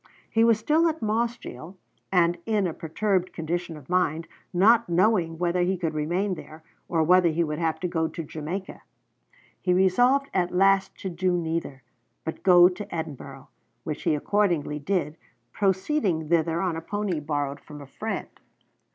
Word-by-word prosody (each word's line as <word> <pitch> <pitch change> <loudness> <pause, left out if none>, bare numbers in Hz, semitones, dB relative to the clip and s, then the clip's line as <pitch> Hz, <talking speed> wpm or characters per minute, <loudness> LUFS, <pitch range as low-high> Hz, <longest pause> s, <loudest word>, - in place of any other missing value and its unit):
He 225 - +3
was 230 -2 +5
still 305 +9 +2
at 320 -4 -2
Mossgiel, 215 - -3 0.3
and 175 -2 +3
in 210 -3 +1
a 170 - -2
perturbed 185 +3 -1
condition 170 0 -3
of 140 -3 -14
mind, 170 -3 0 0.2
not 220 +5 +4
knowing 175 -2 +2
whether 175 +1 0
he 185 +2 +1
could 165 -3 -2
remain 175 +6 -1
there, 160 -2 -10 0.3
or 165 -2 +2
whether 180 +1 +5
he 165 +2 +1
would 150 -1 -3
have 165 -2 -1
to 180 - 0
go 165 -2 0
to 165 +1 -6
Jamaica. 160 +6 -6 0.8
He 180 -1 +2
resolved 245 +9 +3
at 180 -2 +1
last 195 +1 +3
to 190 - -3
do 180 +1 0
neither, 160 -5 -3 0.4
but 160 - -4
to - - -28
go 180 -2 +7
to 190 +1 -5
Edinburgh, 140 -4 -7 0.3
which 150 -1 -4
he - - +1
accordingly 170 -4 0
did, 160 -1 -2 0.3
proceeding 190 - 0
thither 165 0 +2
on 180 -4 -1
a 165 - -4
pony 205 -2 -2
borrowed 145 -1 -3
from 150 -1 -12
a 140 - -10
friend. 215 +11 -5
175 Hz, 170 wpm, -26 LUFS, 160-195 Hz, 0.8 s, go